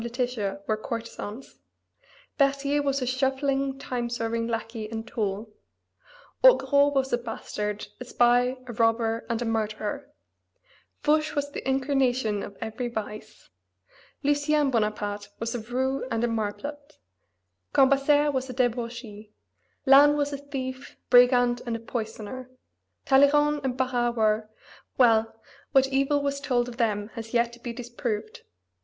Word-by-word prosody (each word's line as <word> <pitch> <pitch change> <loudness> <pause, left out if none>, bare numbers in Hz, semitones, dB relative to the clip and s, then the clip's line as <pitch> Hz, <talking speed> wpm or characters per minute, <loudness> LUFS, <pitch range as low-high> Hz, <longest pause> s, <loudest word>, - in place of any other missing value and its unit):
Letitia 235 -5 -3
were 215 - 0
courtesans; 230 +1 -7 0.8
Berthier 280 +1 +2
was 275 -2 0
a - - -1
shuffling, 270 +1 0
time 245 -3 -3
serving 230 -1 -2
lackey 225 -1 -4
and 225 0 -5
tool; 210 -1 -3 0.9
Augereau 285 -13 +6
was 270 -2 0
a 240 - +2
bastard, 210 -3 -5
a 250 - -7
spy, 245 +1 +3
a 240 - -7
robber, 225 0 +1
and 230 +1 -1
a - - -4
murderer; 220 +4 -3 0.9
Fouche 305 +1 +2
was 285 0 -2
the 270 - -4
incarnation 260 -5 +1
of 200 - -8
every 225 +3 -4
vice; 215 -2 -7 0.7
Lucien 290 0 +2
Bonaparte 210 -2 -1
was 230 0 -3
a 240 - -2
roue 260 +4 -2
and 230 -1 -1
a - - +3
marplot; 240 +7 -4 0.7
Cambaceres 280 +2 +4
was 260 0 -2
a - - -5
debauchee; 235 -3 -3 0.5
Lannes 285 +2 +7
was 290 0 -1
a - - -2
thief, 270 -2 -6
brigand, 245 -1 +5
and 235 - -1
a - - -4
poisoner; 230 +2 -6 0.6
Talleyrand 295 +2 +4
and 260 -1 -2
Barras 245 -2 0
were 215 0 +1 0.5
well, 225 -3 +3 0.3
what 270 0 +5
evil 275 +2 +1
was 280 0 -2
told 245 -3 +1
of 240 -1 -8
them 210 -3 0
has 230 0 -7
yet 235 0 +2
to 240 - -13
be 240 0 -5
disproved. 235 -3 -5
245 Hz, 135 wpm, -26 LUFS, 225-275 Hz, 0.9 s, Lannes